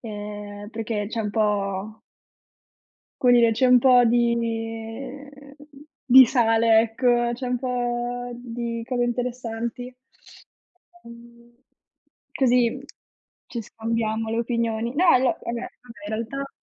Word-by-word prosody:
ehm, 205 -2 -8
perché 220 -2 -3
c'è 230 0 -3
un 210 -2 -3
po 205 0 -2 1.2
come 250 -1 +5
dire, 235 -1 +5
c'è 255 +3 +2
un 250 - +7
po' 250 0 +5
di, 235 0 +3
uhm, 235 +5 -6 0.5
di 260 0 +9
sale, 225 -2 +3
ecco, 240 +1 +1
c'è 250 +2 -6
un 250 0 -1
po' 245 -1 -3
di 235 -1 -5
cose 245 +1 -1
interessanti. 240 0 -4 1.1
Mhmm, 235 0 -15 0.8
così 250 -1 +2 0.7
ci 235 - -5
scambiamo 225 0 -3
le 230 - -1
opinioni. 235 0 -2
No 360 - +2
io 255 - -1
vabbè 250 - 0
vabbè 235 0 -4 0.5
in 215 - -4
realtà 275 +5 -5
235 Hz, 120 wpm, -23 LUFS, 225-245 Hz, 1.2 s, di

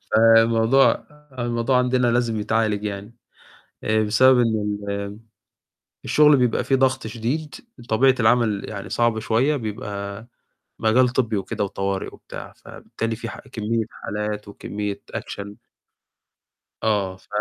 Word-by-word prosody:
فالموضوع 115 +3 +5 0.3
الموضوع 120 +1 +1
عندنا 125 0 +2
لازم 120 -2 +1
يتعالج 105 -1 0
يعني، 105 +2 -5 0.7
آآ 110 0 +2
بسبب 125 +5 +5
إن 115 -2 +2 0.3
ال 100 +1 -4 0.9
الشغل 150 -1 +5
بيبقى 125 -3 +1
فيه 135 - +2
ضغط 130 -2 +1
شديد، 120 +8 -3 0.3
طبيعة 130 +4 +4
العمل 110 -3 +2
يعني 100 -2 -6
صعبة 120 -2 +1
شوية، 125 +8 +1
بيبقى 105 -3 -5 0.5
مجال 120 +3 +4
طبي 120 -3 0
وكده 100 +1 -2
وطوارئ 95 0 -2
وبتاع. - - -10
فبالتالي 115 0 -5
في 115 0 -6
ح - - -8
كمية 110 +1 -1
حالات 105 0 -5
وكمية 100 0 -5
أكشن. 100 0 -6 1.3
آه، 100 -4 0
ف - - -24
110 Hz, 120 wpm, -23 LUFS, 105-120 Hz, 1.3 s, فالموضوع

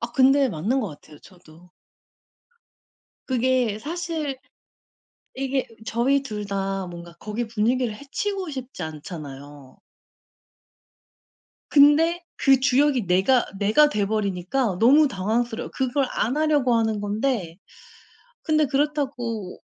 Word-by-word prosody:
아 235 0 -5
근데 270 +1 +4
맞는 215 - -1
것 215 - -3
같아요 150 -1 -14
저도. 175 -1 -18 1.6
그게 255 -4 +1
사실 320 -1 -4 1.0
이게 270 0 -1 0.2
저희 265 +5 +1
2 210 -6 -5
다 195 -1 -2
뭔가 170 -1 -10
거기 215 +3 -4
분위기를 235 +1 0
해치고 370 - -4
싶지 260 - -7
않잖아요. 145 -4 -9 1.9
근데 315 +4 +5
그 270 -2 +4
주역이 265 -3 +2
내가 190 +8 +3
내가 215 +9 +4
돼 210 -8 -1
버리니까 200 +1 -1
너무 280 +7 +6
당황스러 225 +2 -2
그걸 265 +1 0
안 245 +6 -1
하려고 295 -5 +2
하는 220 -2 +1
건데 205 -4 -2 0.9
근데 310 -1 +2
그렇다고 265 -8 -2
240 Hz, 225 characters per minute, -24 LUFS, 195-275 Hz, 1.9 s, 너무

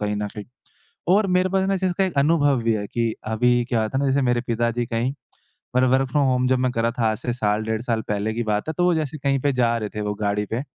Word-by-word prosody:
कहीं 105 0 -1
न 105 0 -2
कहीं। 105 -1 -7 0.7
और 210 -1 +2
मेरे 185 0 +2
पास 190 0 +1
ना 195 - +1
इस 190 - -4
चीज़ 185 -1 +1
का 195 - +3
एक 185 - -3
अनुभव 145 -3 +3
भी 115 -1 +2
है 105 -1 -3
कि 115 0 -1 0.2
अभी 120 +2 +3
क्या 115 -3 +1
होता 110 +5 -2
है - - +1
ना, 135 - +2
जैसे 140 +1 +2
मेरे 120 -1 +1
पिताजी 120 +1 0
कहीं 115 +4 -1 0.6
मतलब 130 0 +4
वर्क 130 0 +2
फ्रॉम 145 +1 +2
होम 125 0 +2
जब 130 - +3
मैं 130 - +1
कर 115 - -1
रहा 115 - +2
था 115 - +2
आज 110 - -3
से 120 - -3
साल-डेढ़ 110 0 -1
साल 115 -3 -1
पहले 105 +1 -1
की 120 - -2
बात 105 +3 -1
है, - - -2
तो 175 - +2
वो 180 - +4
जैसे 155 -1 -2
कहीं 135 0 +1
पे 145 - +2
जा 120 -2 +2
रहे 105 -2 -4
थे 105 - -2
वो 105 0 -2
गाड़ी 105 0 -1
पे, 115 +5 -3
120 Hz, 290 wpm, -23 LUFS, 110-140 Hz, 0.7 s, मतलब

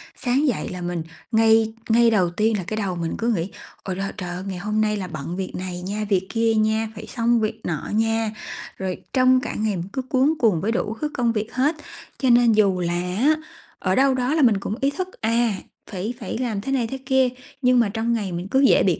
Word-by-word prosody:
Sáng 270 +4 +1
dậy 240 - -1
là 180 -1 -6
mình 175 -2 -3 0.3
ngay 220 0 +4 0.2
ngay 235 +1 +5
đầu 185 -6 +3
tiên 215 +4 +1
là 185 - -3
cái 215 - -3
đầu 195 -4 -1
mình 165 -1 -3
cứ 230 - -2
nghĩ 175 0 -2 0.3
ôi 185 -2 -3
lơ 195 +1 -3
trời 180 -3 -4
ơi, 180 +1 -5
ngày 190 -2 -4
hôm 210 +4 -1
nay 210 -1 +1
là 185 -2 -4
bận 155 +1 -5
việc 190 - -3
này 180 -1 -5
nha, 205 +4 -3
việc 190 -1 +1
kia 225 -1 +2
nha, 220 0 +1
phải - - -8
xong 235 0 +1
việc 215 -1 -2
nọ 160 -4 -3
nha, 225 0 +1 0.5
rồi 190 -1 -4
trong 255 -1 +5
cả - - -4
ngày 215 -2 0
mình 170 +2 -4
cứ 265 - -1
cuống 260 +3 +2
cuồng 205 -9 +3
với 225 - 0
đủ 220 -2 -1
thứ 300 - 0
công 240 -3 +1
việc 215 -1 -3
hết. 285 +5 +2 0.4
Cho 260 - +1
nên 240 -1 +6
dù 200 -4 +3
là 175 -1 -1 0.2
á, 290 +7 +4 0.4
ở 185 0 +1
đâu 270 0 +4
đó 255 +2 0
là 315 - +2
mình 225 -6 +5
cũng 210 - -3
ý 275 - +3
thức, 370 +4 -3
à, 230 +1 +2 0.4
phải 200 +5 -3
phải 220 -1 -4
làm 230 -5 -2
thế 270 - -4
này 250 -4 +1
thế 270 - -5
kia, 265 -1 +3 0.3
nhưng 250 -1 +4
mà 230 -4 +3
trong 225 +3 -1
ngày 205 -5 -2
mình 175 +2 -4
cứ 265 - +4
dễ 275 - +5
bị 180 -4 +2
220 Hz, 245 wpm, -23 LUFS, 190-245 Hz, 0.5 s, nên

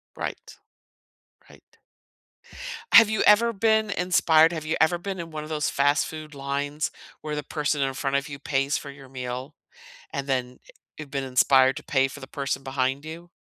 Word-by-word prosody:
Right. - - -6 0.9
Right. - - -21 1.1
Have 225 -2 +9
you 220 - 0
ever 230 +3 +5
been 220 0 +2
inspired 175 -4 +4
have 160 -2 -5
you 160 - -1
ever 160 +2 +3
been 190 0 -5
in 165 -1 -7
one 155 - -5
of 155 - -9
those 150 -1 -1
fast 145 +2 +2
food 155 -1 -9
lines 140 +2 -3 0.3
where 150 -1 -4
the 150 - -2
person 150 -1 -1
in 135 -1 0
front 135 +1 -1
of 140 +1 -1
you 140 - -7
pays 140 0 0
for 140 - -8
your 135 -1 -14
meal, 130 +2 -6 0.6
and 140 -1 -3
then, 125 -2 -2
eh - - -16 0.3
you've 150 -2 -8
been 140 -1 -2
inspired 130 +1 +4
to - - -6
pay 135 -1 +2
for 145 - -10
the 130 - -9
person 135 0 -3
behind 135 +1 -1
you? 165 +2 -9
145 Hz, 190 wpm, -25 LUFS, 135-160 Hz, 1.1 s, Have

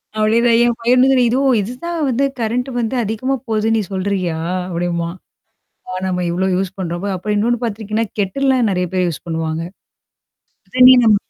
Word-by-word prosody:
அப்டின்னுவேன் 230 +2 +3
என் 240 - +1
பையனும் 250 +2 +4
கூட - - +4
"ஓ! - - +4
இதுவும் 265 0 +2
இதுதான் 255 - -5
வந்து 255 +3 +1
கரண்ட் 240 +4 -1
வந்து 235 +2 -1
அதிகமா 225 +6 -1
போதுன்னு 220 0 +1
நீ - - +1
சொல்றியா?" 185 -3 -1 0.3
அப்படிம்பான். 170 0 -2 0.7
ஆ - - -5 0.2
நம்ம 180 -1 -1
இவ்ளோ 190 +2 0
யூஸ் 190 0 -2
பண்றோம்மா 175 +2 -3
அப்புறம் 210 +3 -2
இன்னொன்னு 235 +3 0
பாத்துருக்கீங்கன்னா, 220 0 -2
கெட்டில்லாம் 255 +4 +1
நெறைய 180 -1 -1
பேர் 180 -1 +1
யூஸ் 165 - -5
பண்ணுவாங்க. 160 0 -2 1.0
சுடு - - -12
தண்ணீ 255 0 +9
நம்ம 215 -2 +5
215 Hz, 165 wpm, -18 LUFS, 185-240 Hz, 1.0 s, தண்ணீ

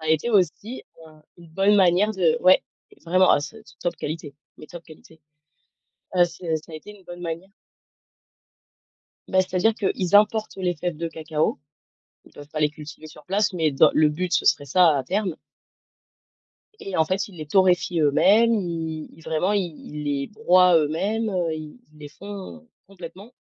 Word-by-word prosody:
ça - - -10
a - - -3
été 160 +8 +1
aussi 205 +5 0 0.2
enfin 155 -1 -17 0.2
une 170 -1 -15
bonne 195 +5 +2
manière 190 +2 +3
de 175 -6 +2
ouais, 185 +1 +5 0.4
vraiment, 185 +2 +4
ah - - +4
c'est 220 +9 -10
c - - -18
top 175 - -2
qualité, 150 -2 -6 0.2
mais 155 - -12
top 175 +1 -11
qualité. 160 0 -17 1.0
Heu, 175 - +6
c'est 170 -1 -3
ça 155 +1 -12
a - - -8
été 155 +6 -10
une 190 - -21
bonne 175 0 -10
manière 170 +2 -6 1.8
Bah, 190 - +3
c'est-à-dire 185 +4 +1
qu'ils 190 -3 -2
importent 215 +1 +2
les 180 -2 -1
fèves 175 +1 -4
de 165 +2 -4
cacao. 160 -1 -2 0.7
Ils - - -19
peuvent 145 0 -13
pas 155 - -5
les 150 -1 +2
cultiver 155 +1 -11
sur 150 -1 -15
place, 200 +2 0
mais 160 -4 0
dans 135 - +4
le 155 -1 +4
but, 175 +4 -3
ce - - +1
serait 145 - +2
ça 165 +1 +4
à 135 - -2
terme 190 +2 -2 1.4
et 195 - -6
en 160 - +3
fait, 185 +4 -2
ils 190 - -15
les 155 -2 -7
torréfient 180 0 +2
eux-mêmes. 200 +10 +4
I 160 -2 -5
ils 165 - -17
vraiment, 160 +5 -1
ils 200 -2 +1 0.2
ils 150 0 -7
les 140 -1 -2
broient 185 -5 +4
eux-mêmes, 200 +9 -1
heu, 175 -4 -1
ils 155 +5 -9 0.2
les 150 -1 -11
font 185 - -10 0.2
complètement, 190 +4 -12
175 Hz, 180 wpm, -23 LUFS, 155-190 Hz, 1.8 s, Heu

